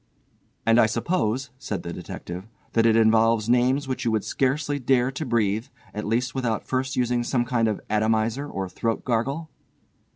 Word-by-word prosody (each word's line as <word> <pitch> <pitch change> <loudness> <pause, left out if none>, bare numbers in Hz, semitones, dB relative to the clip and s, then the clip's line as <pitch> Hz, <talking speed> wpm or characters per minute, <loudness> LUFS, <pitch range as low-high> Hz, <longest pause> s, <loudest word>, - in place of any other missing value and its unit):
"And 115 +1 +5
I 110 - +6
suppose," 130 -1 -1
said 105 -6 -4
the 85 - -5
detective, 90 +4 -7 0.3
"that 115 0 +4
it 110 - +4
involves 115 0 +4
names 125 +4 +2
which 130 - -3
you 120 - +1
would 110 -2 0
scarcely 145 +2 0
dare 125 0 +2
to 145 +3 -4
breathe, 110 0 +1 0.3
at 105 - -4
least 115 +2 0
without 120 -4 -1
first 130 +1 -1
using 125 -1 +1
some 120 0 0
kind 120 -2 +1
of 105 -2 -1
atomiser 110 +6 0
or 95 -1 -3
throat 115 +4 -2
gargle." 135 +7 -1
120 Hz, 170 wpm, -25 LUFS, 110-130 Hz, 0.3 s, I